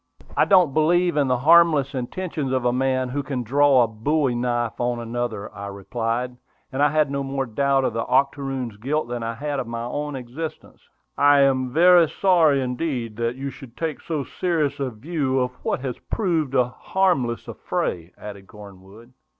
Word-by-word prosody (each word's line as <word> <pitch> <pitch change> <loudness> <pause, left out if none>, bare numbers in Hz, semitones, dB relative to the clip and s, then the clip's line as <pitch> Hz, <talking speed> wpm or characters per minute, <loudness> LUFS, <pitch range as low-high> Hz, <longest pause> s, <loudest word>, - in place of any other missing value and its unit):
"I - - +4
don't 180 -8 +4
believe 175 +3 +2
in 145 -2 +2
the 125 -1 +2
harmless 155 -1 +5
intentions 140 +2 -4
of 130 -2 0
a 120 - +2
man 130 0 0
who 140 +3 -2
can 135 -3 -4
draw 135 +1 +4
a - - +1
bowie 130 +5 0
knife 120 -1 -1
on 120 0 0
another," 115 -3 -4
I 100 0 -7
replied; 115 +5 -3 0.3
and 130 - -2
I 145 - +5
had 155 -2 +1
no 140 0 -1
more 135 0 -2
doubt 135 +3 +1
of - - -1
the 115 0 -3
octoroon's 135 -4 0
guilt 135 +4 -2
than 120 -1 -4
I 115 0 -3
had 145 +2 -3
of 125 - -4
my 115 0 -4
own 145 +4 -4
existence. 135 +6 -7 0.4
"I 145 0 +6
am 130 -2 +2
very 170 +2 +6
sorry 165 -8 +3
indeed 125 -3 -3
that 115 +1 -1
you 135 +1 -5
should 125 -2 -13
take 160 -3 -3
so 155 -4 -3
serious 155 -2 -1
a 135 -2 -1
view 135 +3 -2
of 125 0 0
what - - -1
has 130 -3 -4
proved 165 - 0
a 125 -2 +4
harmless 135 -8 0
affray," 85 -1 -3
added 100 -2 -10
Cornwood. 105 +3 -14
130 Hz, 185 wpm, -23 LUFS, 120-150 Hz, 0.4 s, I